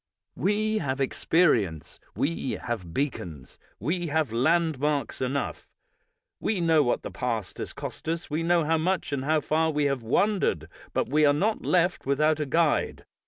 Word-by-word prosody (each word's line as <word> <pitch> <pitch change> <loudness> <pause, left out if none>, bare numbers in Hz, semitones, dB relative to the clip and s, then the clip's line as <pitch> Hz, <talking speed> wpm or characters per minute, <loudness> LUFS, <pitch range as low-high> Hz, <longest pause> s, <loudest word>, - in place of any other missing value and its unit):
We 215 +3 +1
have 135 -6 -2
experience, 125 - +1 0.2
we 135 - -1
have 95 -8 -4
beacons, 85 - -4 0.2
we 175 +2 -1
have 155 -5 0
landmarks 150 +1 +1
enough. 135 +2 -2 0.7
We 210 - -1
know 165 -2 +4
what 120 -4 0
the - - -6
past 115 -6 -3
has - - -4
cost - - -8
US; 165 +1 -2
we 155 +2 -2
know 170 0 +3
how 160 +1 +1
much 180 0 -1
and 135 -2 -1
how 155 +1 +2
far 160 +2 +1
we 150 -1 0
have 140 -3 0
wandered, 120 - +1 0.3
but - - 0
we 150 +3 +2
are 145 -1 +6
not 210 +9 0
left 175 -4 +1
without 155 +3 +2
a 150 - -1
guide. 160 +2 +1
150 Hz, 165 wpm, -27 LUFS, 130-165 Hz, 0.7 s, are